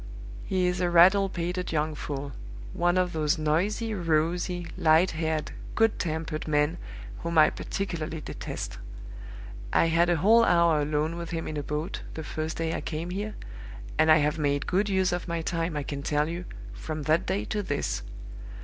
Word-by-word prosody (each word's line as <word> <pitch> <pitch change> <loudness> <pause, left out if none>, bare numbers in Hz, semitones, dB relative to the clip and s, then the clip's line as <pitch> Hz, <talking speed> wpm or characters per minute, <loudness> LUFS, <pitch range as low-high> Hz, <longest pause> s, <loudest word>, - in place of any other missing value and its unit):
He 185 -1 0
is 180 0 0
a 175 - +2
rattle 190 +3 +6
pated 180 +1 -3
young 155 0 0
fool 140 -1 -5 0.4
one 175 +1 +2
of 180 -1 +1
those 155 +1 +1
noisy, 185 +9 0
rosy, 175 0 0
light 160 +3 +4
haired, 160 -1 -2 0.2
good 225 -1 +3
tempered 160 -2 -3
men 150 +2 +1 0.4
whom 170 0 -2
I 155 - +7
particularly 165 -5 -4
detest. - - -6 0.9
I 165 - +3
had 170 +2 +3
a 175 - +4
whole 220 +8 +5
hour 170 -6 +4
alone 150 +3 -1
with 170 -1 -5
him 165 -1 -3
in 155 - -4
a 145 - -2
boat, 150 +3 -4
the 160 - -5
first 155 +1 -4
day 165 0 -1
I - - -3
came 165 +2 -4
here, 205 +3 -4 0.6
and 160 - +6
I 155 - +8
have 150 +1 +1
made 145 -1 0
good 200 +3 +1
use 190 -2 +2
of 175 0 -3
my 170 -1 -2
time, 165 -1 -1
I 145 - -2
can 140 0 -5
tell 150 +1 +1
you, 170 +2 -5 0.3
from 150 - -5
that 155 +3 +2
day 190 +2 -1
to 210 - -2
this. 145 - -2
165 Hz, 180 wpm, -27 LUFS, 155-180 Hz, 0.9 s, I